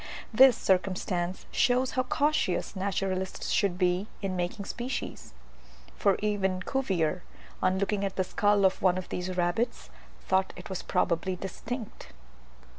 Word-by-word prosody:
This 255 +1 +7
circumstance 185 -1 0
shows 255 0 +2
how 255 - +1
cautious 280 -8 0
naturalists 190 -1 -2
should 195 -4 +2
be 180 +2 +1 0.2
in 190 -1 -1
making 180 +3 -3
species; 245 +4 -5 0.6
for 195 - +3
even 190 -3 0
Cuvier, 185 -10 0 0.4
on 185 0 +2
looking 200 +1 0
at 195 -1 -2
the 190 - +1
skull 205 +2 +2
of 190 - +2
one 185 -1 +3
of 185 - -5
these 180 0 -3
rabbits, 175 - -1 0.4
thought 190 0 +2
it - - -9
was 185 - -3
probably 180 0 0
distinct! 210 - -7
190 Hz, 135 wpm, -29 LUFS, 180-210 Hz, 0.6 s, This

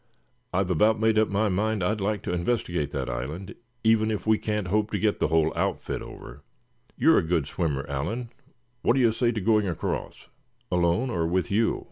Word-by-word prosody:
"I've 95 0 0
about 110 +6 +3
made 110 -1 +3
up 110 - +3
my 100 +2 +1
mind 105 +1 0
I'd 105 +3 0
like 105 0 -1
to - - -2
investigate 85 - -1
that 70 -3 -3
island, 65 +10 -5 0.3
even 110 -1 +3
if 105 -2 -3
we 110 -1 +3
can't 105 -4 -2
hope 105 +2 +1
to 105 - -1
get 105 +1 0
the - - +2
whole 80 0 +2
outfit - - -2
over. - - -10 0.6
You're 160 - +5
a - - +1
good 80 -3 0
swimmer, 75 -3 -2
Allan, 110 - -3 0.5
what - - +3
do - - +2
you 120 -3 +4
say 120 +1 +1
to 110 - -3
going 105 0 +2
across?" 85 -3 -4 0.4
"Alone, 90 +8 +1
or 85 -4 0
with 90 +3 -1
you?" 110 +3 +2
100 Hz, 195 wpm, -26 LUFS, 85-110 Hz, 0.6 s, You're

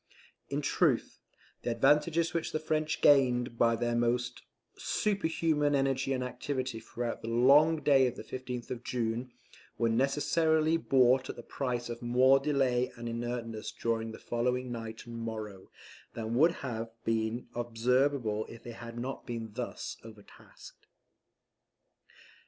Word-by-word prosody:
In - - -1
truth, - - +1 0.4
the - - -2
advantages 150 +7 +3
which 170 - -2
the 155 - 0
French 155 0 -1
gained 125 -4 +4
by 115 0 +4
their 120 +1 -1
almost 120 +1 0 0.3
superhuman 160 -7 0
energy 135 0 +1
and 130 -1 0
activity 125 -1 -3
throughout 120 +1 -5
the - - -7
long 145 +7 +5
day 135 -3 +5
of 120 - -4
the - - -8
15th 125 0 -6
of 120 -1 -5
June, 120 +1 -2 0.5
were 115 - +2
necessarily 155 +6 +2
bought 130 -4 +3
at - - -4
the 120 - -9
price 125 -2 -3
of 120 0 -6
more 130 +3 +5
delay 135 -3 +1
and 120 0 -6
inertness 115 -1 -4
during 115 -1 -2
the - - -9
following 125 +1 -1
night 115 -1 -6
and 120 -1 -7
morrow, 110 -4 -6 0.5
than 115 0 -3
would 160 +8 +5
have 115 -2 -4 0.2
been 115 +1 -1
observable 120 -1 0
if 115 - -11
they 120 - -7
had 115 0 -9
not 130 +3 -5
been 115 -2 -5
thus 125 +1 -5
overtasked. 110 -2 -15
125 Hz, 140 wpm, -31 LUFS, 115-135 Hz, 0.5 s, long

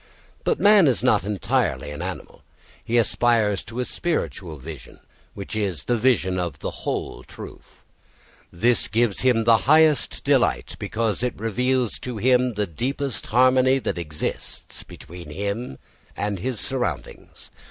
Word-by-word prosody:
But 470 - 0
man 205 -5 +6
is 130 - +1
not 105 - +3
entirely 100 -6 -1
an 75 +3 -7
animal. 90 0 -7 0.4
He 120 - 0
aspires 110 -2 +2
to 115 +2 -7
a 125 - 0
spiritual 100 - -3
vision, 75 +2 -10 0.4
which 100 +1 -6
is 100 -6 -2
the 120 - +1
vision 105 -7 +2
of 85 -5 -3
the - - -4
whole - - -4
truth. - - -13 0.7
This 115 +7 +2
gives 115 -1 +1
him 125 -3 +3
the 115 0 +6
highest 155 -3 +4
delight, - - +1
because 110 -2 -1
it 125 0 -2
reveals 125 +3 0
to 125 -3 -5
him 125 +2 +3
the 105 0 0
deepest 130 - -3
harmony 130 +2 +4
that 120 - -3
exists 75 -3 -5
between 85 0 -11
him 100 - -4 0.4
and 100 -2 -2
his 125 +3 -3
surroundings. 130 -2 -4
115 Hz, 140 wpm, -23 LUFS, 95-125 Hz, 0.7 s, man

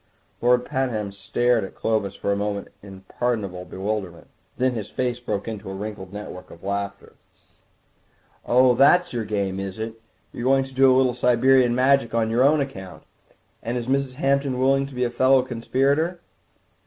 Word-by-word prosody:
Lord 125 +1 +3
Pabham 125 -7 -2
stared 115 +4 0
at 95 - -8
Clovis 110 -3 -1
for 100 - -2
a - - +2
moment 100 0 -3
in 95 -2 -12
pardonable 100 -4 -3
bewilderment; 95 -2 -5 0.3
then 130 +1 +2
his 110 -3 -5
face 125 -1 -2
broke 115 -4 -4
into 105 -4 -6
a 95 - -5
wrinkled 100 -2 -7
network 105 -3 -8
of 85 - -14
laughter. 100 0 -4 1.3
"Oh, 125 +1 +4
that's 145 +8 +4
your 115 -2 -2
game, 100 -2 -2
is 95 0 -5
it? 110 0 -6 0.3
You - - -6
are - - +3
going 135 0 +4
to 135 0 -11
do 135 0 +5
a 130 - +4
little 130 -1 +3
Siberian 125 0 +3
Magic 130 -2 +2
on 110 -1 +1
your 120 +2 +2
own 145 +2 +4
account. 95 -10 -7 0.6
And 120 +3 -3
is 120 - -3
Mrs. 135 -1 0
Hampton 140 -1 0
willing 135 +1 +2
to 135 - -12
be 125 - 0
a 120 - -1
fellow 130 +1 +4
conspirator?" 135 +8 0
120 Hz, 180 wpm, -23 LUFS, 100-130 Hz, 1.3 s, do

